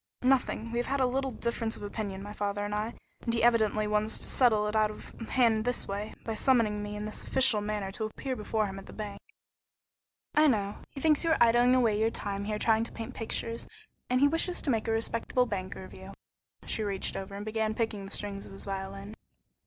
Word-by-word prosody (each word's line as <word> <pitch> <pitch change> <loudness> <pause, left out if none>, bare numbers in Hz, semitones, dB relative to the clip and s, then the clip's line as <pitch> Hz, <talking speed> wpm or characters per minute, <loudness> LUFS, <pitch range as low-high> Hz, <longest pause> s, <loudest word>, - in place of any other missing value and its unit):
"Nothing. 250 -3 +2
We 235 - 0
have 240 - -1
had 275 +1 0
a 260 - +4
little 265 +2 0
difference 235 -1 -2
of - - -10
opinion, 200 -2 -4
my 205 +1 -7
father 205 0 -2
and 205 - -3
I, 215 +3 -2 0.3
and 235 - -1
he 230 0 0
evidently 220 -3 +4
wants 210 +1 +1
to - - -7
settle 220 -5 +3
it 210 +1 -2
out 215 -1 +4
of 210 - -9 0.2
hand 230 -4 +3
his 245 - 0
way, 205 +2 -4
by 225 - -2
summoning 220 -3 +3
me 205 0 -5
in 210 0 -4
this 215 - -4
official 255 -5 +5
manner 205 -2 -2
to 220 +3 -3
appear 255 +4 -4
before 215 -1 0
him 195 -1 -5
at 195 - -12
the - - -10
bank." 210 -2 -6 1.1
"I 305 0 +6
know. 205 -6 +1
He 275 - -8
thinks 310 +1 +4
you 330 - +1
are 320 - +4
idling 240 +2 +5
away 225 -5 +3
your 220 +1 +3
time 200 -2 -4
here 210 0 -1
trying 220 +1 +3
to - - -8
paint 230 +2 -6
pictures, 230 0 -3 0.4
and 250 0 +3
he 285 - +7
wishes 330 +4 +1
to 280 - +1
make 225 -2 0
a - - +1
respectable 230 +2 +1
banker 190 -3 -4
of - - -11
you." 190 +1 -10 0.5
She - - -1
reached 200 -2 -1
over 195 +1 -5
and 205 +1 -6
began 215 0 -1
picking 220 -4 -2
the - - -11
strings 200 -1 -4
of - - -11
his 195 - -8
violin. 195 +1 -5
215 Hz, 230 wpm, -30 LUFS, 205-240 Hz, 1.1 s, he